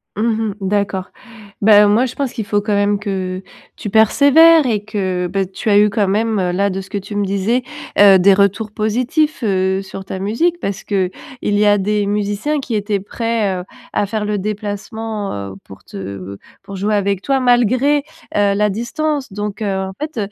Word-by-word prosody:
Mmh 215 Hz, -, -1 dB, 0.3 s
mh. -, -, -7 dB
D'accord. 195 Hz, -1 st, -1 dB, 0.5 s
Bah, 210 Hz, 0 st, +7 dB
moi, 220 Hz, +5 st, +3 dB
je 250 Hz, -, -5 dB
pense 275 Hz, -3 st, -2 dB
qu'il 220 Hz, -4 st, -4 dB
faut 205 Hz, 0 st, 0 dB
quand 210 Hz, 0 st, -2 dB
même 205 Hz, 0 st, +1 dB
que 185 Hz, -2 st, -3 dB, 0.4 s
tu 210 Hz, -, -5 dB
persévères 285 Hz, +9 st, +6 dB
et 210 Hz, -4 st, 0 dB
que, 190 Hz, -4 st, -2 dB
bah 195 Hz, +2 st, -1 dB
tu 195 Hz, +4 st, -5 dB
as 205 Hz, -, +5 dB
eu 210 Hz, 0 st, +5 dB
quand 205 Hz, -1 st, 0 dB
même, 220 Hz, +2 st, 0 dB
là 200 Hz, +3 st, +1 dB
de 195 Hz, 0 st, -3 dB
ce 190 Hz, -, -13 dB
que 205 Hz, -, -3 dB
tu 205 Hz, +2 st, -8 dB
me 205 Hz, 0 st, 0 dB
disais, 200 Hz, +6 st, 0 dB, 0.3 s
heu, 200 Hz, -2 st, +7 dB
des 195 Hz, +2 st, +6 dB
retours 200 Hz, +2 st, +1 dB
positifs, 250 Hz, +9 st, 0 dB
heu, 190 Hz, -1 st, +1 dB
sur 195 Hz, 0 st, -8 dB
ta 190 Hz, -, -5 dB
musique 280 Hz, -, 0 dB
parce 200 Hz, -, -4 dB
qu'il 190 Hz, -3 st, -1 dB, 0.3 s
y 205 Hz, 0 st, +1 dB
a 205 Hz, 0 st, +5 dB
des 205 Hz, +1 st, 0 dB
musiciens 205 Hz, +8 st, -1 dB
qui 250 Hz, -4 st, -4 dB
étaient 205 Hz, -1 st, -1 dB
prêts, 215 Hz, -2 st, -2 dB
heu, -, -, -9 dB, 0.3 s
à -, -, +1 dB
faire 210 Hz, +1 st, -3 dB
le 210 Hz, 0 st, -1 dB
déplacement, 210 Hz, +1 st, -4 dB, 0.2 s
heu, -, -, -10 dB
pour 95 Hz, -, -14 dB
te -, -, -10 dB
heu, 100 Hz, 0 st, -7 dB, 0.3 s
pour 195 Hz, 0 st, -9 dB
jouer 205 Hz, +3 st, 0 dB
avec 200 Hz, -2 st, 0 dB
toi 270 Hz, +4 st, +1 dB
malgré, 255 Hz, +3 st, +3 dB, 0.4 s
heu, 205 Hz, -1 st, +3 dB
la 210 Hz, +1 st, +1 dB
distance. 270 Hz, -, -2 dB
Donc, 205 Hz, +1 st, -5 dB
heu, 200 Hz, -2 st, -1 dB
en 190 Hz, -, -7 dB
fait, 305 Hz, -3 st, -5 dB
205 Hz, 200 wpm, -17 LUFS, 195-225 Hz, 0.5 s, Bah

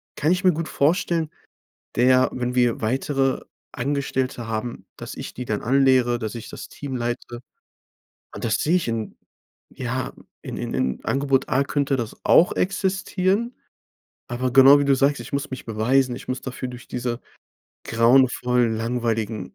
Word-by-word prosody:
kann 155 Hz, +3 st, +1 dB
ich 185 Hz, +1 st, +1 dB
mir 180 Hz, -2 st, +5 dB
gut 160 Hz, +1 st, -4 dB
vorstellen, 165 Hz, +1 st, +1 dB, 0.7 s
der 130 Hz, +1 st, +5 dB
wenn 125 Hz, 0 st, -2 dB
wir 120 Hz, -3 st, +2 dB
weitere 135 Hz, +3 st, 0 dB, 0.3 s
Angestellte 130 Hz, -2 st, -2 dB
haben, 115 Hz, +2 st, -4 dB
dass -, -, -8 dB
ich -, -, -7 dB
die 125 Hz, -, -5 dB
dann 105 Hz, -2 st, -2 dB
anlehre, 130 Hz, -1 st, +3 dB
dass 110 Hz, 0 st, -4 dB
ich 115 Hz, -1 st, -7 dB
das -, -, -8 dB
Team 135 Hz, -3 st, -6 dB
leite. 120 Hz, 0 st, -4 dB, 0.9 s
Und -, -, -7 dB
das 110 Hz, -3 st, +1 dB
sehe 170 Hz, +4 st, +2 dB
ich 165 Hz, -, -1 dB
in 115 Hz, -2 st, -3 dB, 0.6 s
ja, 125 Hz, 0 st, -4 dB, 0.3 s
in -, -, -7 dB
in -, -, -4 dB
in 65 Hz, 0 st, -1 dB
Angebot 135 Hz, -1 st, +1 dB
A 135 Hz, +2 st, +2 dB
könnte 140 Hz, -1 st, 0 dB
das 120 Hz, -3 st, -4 dB
auch 175 Hz, -, +5 dB
existieren. 195 Hz, +4 st, 0 dB, 0.7 s
Aber 125 Hz, +1 st, -2 dB
genau 135 Hz, +2 st, +8 dB
wie 140 Hz, -, +1 dB
du 140 Hz, -1 st, +4 dB
sagst, 140 Hz, +2 st, +2 dB
ich -, -, -9 dB
muss 140 Hz, 0 st, -2 dB
mich 130 Hz, -, -6 dB
beweisen. 120 Hz, +3 st, +1 dB
Ich -, -, -11 dB
muss 130 Hz, -, -2 dB
dafür 130 Hz, -1 st, -5 dB
durch 125 Hz, 0 st, -10 dB
diese 120 Hz, -1 st, -3 dB, 0.7 s
grauenvollen, 125 Hz, 0 st, +3 dB
langweiligen 115 Hz, -3 st, -2 dB
130 Hz, 160 wpm, -23 LUFS, 120-140 Hz, 0.9 s, genau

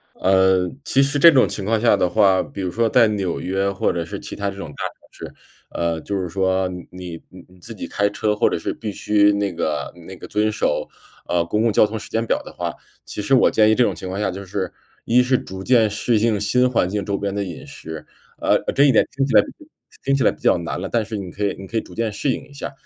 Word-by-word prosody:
呃， 95 Hz, -1 st, +3 dB
其 135 Hz, -, +3 dB
实 140 Hz, +1 st, +1 dB
这 170 Hz, +4 st, +9 dB
种 130 Hz, -3 st, +4 dB
情 100 Hz, -, -5 dB
况 110 Hz, +1 st, +1 dB
下 115 Hz, -3 st, +4 dB
的 90 Hz, -2 st, +1 dB
话， 95 Hz, +1 st, +4 dB
比 100 Hz, -, -9 dB
如 90 Hz, -, -2 dB
说 115 Hz, +6 st, +1 dB
在 115 Hz, 0 st, +5 dB
纽 100 Hz, -4 st, -2 dB
约 95 Hz, +2 st, -1 dB
或 100 Hz, -, 0 dB
者 85 Hz, -1 st, -2 dB
是 -, -, -6 dB
其 -, -, -8 dB
他 100 Hz, 0 st, -2 dB
这 100 Hz, -, -6 dB
种 90 Hz, -5 st, -7 dB
大 75 Hz, -, -12 dB
城 -, -, -10 dB
市， -, -, -10 dB, 0.4 s
呃， 85 Hz, -1 st, -2 dB
就 100 Hz, -, -3 dB
是 90 Hz, -, -3 dB
说 95 Hz, +1 st, 0 dB, 0.2 s
你 90 Hz, -2 st, -8 dB
你 90 Hz, 0 st, -16 dB
自 115 Hz, -, -9 dB
己 -, -, -7 dB
开 100 Hz, 0 st, +1 dB
车 105 Hz, +1 st, -1 dB
或 -, -, +3 dB
者 -, -, -1 dB
是 -, -, -3 dB
必 110 Hz, -3 st, -6 dB
须 105 Hz, +1 st, +3 dB
那 100 Hz, -1 st, -1 dB
个 75 Hz, -3 st, -2 dB
那 95 Hz, -, -9 dB
个 -, -, -10 dB
遵 105 Hz, +1 st, +1 dB
守， -, -, -1 dB, 0.4 s
呃， 85 Hz, -1 st, +1 dB
公 105 Hz, +6 st, 0 dB
共 115 Hz, -, +2 dB
交 -, -, +5 dB
通 110 Hz, +1 st, -2 dB
时 110 Hz, -, -9 dB
间 115 Hz, +1 st, -1 dB
表 -, -, 0 dB
的 -, -, -10 dB
话， -, -, -4 dB, 0.3 s
其 -, -, -6 dB
实 105 Hz, +6 st, +2 dB
我 130 Hz, -, +5 dB
建 110 Hz, -1 st, +4 dB
议 110 Hz, -, +5 dB
这 125 Hz, -, +3 dB
种 105 Hz, -5 st, +2 dB
情 90 Hz, +2 st, -7 dB
况 95 Hz, +2 st, -4 dB
下 105 Hz, -, 0 dB
就 100 Hz, +2 st, -7 dB
是， 95 Hz, -1 st, -3 dB, 0.3 s
一 120 Hz, +2 st, +4 dB
是 125 Hz, +1 st, +3 dB
逐 95 Hz, -3 st, -7 dB
渐 115 Hz, -3 st, +4 dB
适 110 Hz, +3 st, 0 dB
应 110 Hz, -1 st, +2 dB
新 125 Hz, +5 st, +2 dB
环 115 Hz, -7 st, +1 dB
境 100 Hz, 0 st, -2 dB
周 100 Hz, 0 st, -2 dB
边 100 Hz, -1 st, -3 dB
的 100 Hz, -, -1 dB
饮 90 Hz, -4 st, -8 dB
食。 80 Hz, -1 st, -9 dB, 0.3 s
呃， -, -, +3 dB, 0.2 s
这 140 Hz, -, +4 dB
一 140 Hz, -, +5 dB
点 -, -, +5 dB
听 135 Hz, 0 st, +1 dB
起 135 Hz, -, -3 dB
来 -, -, +8 dB, 0.6 s
听 140 Hz, -, +2 dB
起 135 Hz, -, +1 dB
来 -, -, +5 dB
比 -, -, -12 dB
较 -, -, +3 dB
难 85 Hz, +1 st, -4 dB
了， 95 Hz, -, -4 dB
但 115 Hz, -2 st, 0 dB
是 110 Hz, 0 st, -5 dB
你 100 Hz, -3 st, -5 dB
可 105 Hz, -, -3 dB
以 100 Hz, -, -1 dB
你 95 Hz, -, -8 dB
可 115 Hz, -, -6 dB
以 110 Hz, -, +3 dB
逐 -, -, -14 dB
渐 115 Hz, -2 st, -2 dB
适 135 Hz, +6 st, -1 dB
应 -, -, -3 dB
一 -, -, -18 dB
下。 140 Hz, -, -6 dB
100 Hz, 290 characters per minute, -21 LUFS, 95-115 Hz, 0.6 s, 这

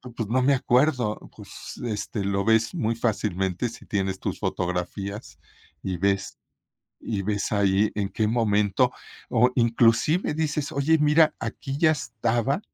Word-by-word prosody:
pues 115 Hz, -4 st, -4 dB
no 130 Hz, +3 st, +2 dB
me 140 Hz, +2 st, +4 dB
acuerdo, 125 Hz, -3 st, +1 dB, 0.2 s
pues, -, -, -10 dB
este, 105 Hz, -1 st, -3 dB
lo 100 Hz, 0 st, -1 dB
ves 110 Hz, 0 st, +3 dB
muy 115 Hz, -8 st, 0 dB
fácilmente 105 Hz, -2 st, -1 dB
si 120 Hz, +3 st, -13 dB
tienes 95 Hz, -2 st, -2 dB
tus -, -, -4 dB
fotografías 95 Hz, +4 st, -4 dB, 0.4 s
y 95 Hz, -2 st, -3 dB
ves 100 Hz, +2 st, -1 dB, 0.6 s
y 105 Hz, -4 st, -3 dB
ves 100 Hz, +1 st, -2 dB
ahí 100 Hz, 0 st, +2 dB
en 100 Hz, -2 st, -1 dB
qué 110 Hz, -, 0 dB
momento, 110 Hz, +1 st, +2 dB, 0.4 s
o 125 Hz, +1 st, +4 dB
inclusive 120 Hz, -, +2 dB
dices: 150 Hz, -2 st, -2 dB
"Oye, 155 Hz, +4 st, +2 dB
mira, 150 Hz, +1 st, +4 dB
aquí 135 Hz, -1 st, -5 dB
ya 155 Hz, -1 st, +4 dB
estaba, 120 Hz, -, -1 dB
115 Hz, 140 wpm, -25 LUFS, 100-130 Hz, 0.6 s, me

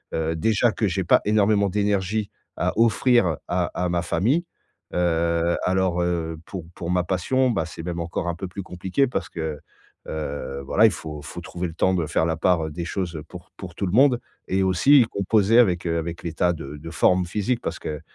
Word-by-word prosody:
heu, 80 Hz, 0 st, -1 dB
déjà 110 Hz, +7 st, +2 dB
que 110 Hz, -, 0 dB
j'ai 95 Hz, +1 st, -1 dB
pas 85 Hz, -, +4 dB
énormément 105 Hz, -1 st, +3 dB
d'énergie 100 Hz, +1 st, 0 dB, 0.3 s
à -, -, 0 dB
offrir 115 Hz, -, +3 dB
à 90 Hz, 0 st, +1 dB
à 90 Hz, 0 st, 0 dB
ma 85 Hz, 0 st, 0 dB
famille, 115 Hz, -, +1 dB, 0.5 s
heu, 85 Hz, -1 st, +1 dB
alors, 90 Hz, -1 st, +1 dB
heu, 85 Hz, -2 st, -1 dB
pour 95 Hz, -4 st, -6 dB
pour 85 Hz, -, -6 dB
ma 90 Hz, 0 st, +2 dB
passion, 120 Hz, +9 st, +1 dB
bah, 80 Hz, -8 st, 0 dB
c'est 80 Hz, -, -8 dB
même 85 Hz, 0 st, -4 dB
encore 85 Hz, +1 st, -3 dB
un 85 Hz, -, 0 dB
peu 95 Hz, +3 st, -5 dB
plus 95 Hz, +2 st, -7 dB
compliqué 95 Hz, +9 st, 0 dB
parce 100 Hz, -8 st, -3 dB
que, 80 Hz, -3 st, -4 dB, 0.5 s
heu, 70 Hz, -3 st, -4 dB
voilà, 105 Hz, +10 st, +4 dB
il -, -, +2 dB
faut 80 Hz, -3 st, -7 dB
il -, -, -13 dB
faut 85 Hz, -, -7 dB
trouver 90 Hz, +1 st, -4 dB
le 80 Hz, -, -8 dB
temps 95 Hz, +2 st, +2 dB
de 85 Hz, -4 st, 0 dB
faire 80 Hz, +1 st, +1 dB
la 80 Hz, -1 st, 0 dB
part, 85 Hz, -1 st, +2 dB
heu, -, -, -7 dB
des 85 Hz, +3 st, -5 dB
choses 85 Hz, -2 st, -3 dB
pour 90 Hz, -1 st, -12 dB
pour 90 Hz, -3 st, -9 dB
tout 100 Hz, -, -2 dB
le 90 Hz, -, -2 dB
monde 130 Hz, +1 st, +5 dB, 0.3 s
et 95 Hz, +1 st, +1 dB
aussi 120 Hz, +9 st, +5 dB
composer 105 Hz, +2 st, +2 dB
avec, 90 Hz, -8 st, +3 dB
heu, 85 Hz, 0 st, 0 dB
avec 85 Hz, +1 st, -4 dB
l'état 85 Hz, +1 st, +1 dB
de 75 Hz, -3 st, -8 dB
de 80 Hz, +3 st, -9 dB
forme 90 Hz, +4 st, +3 dB
physique. 105 Hz, +7 st, -1 dB
Parce -, -, -4 dB
que, 75 Hz, -1 st, -5 dB
90 Hz, 210 wpm, -24 LUFS, 85-100 Hz, 0.5 s, monde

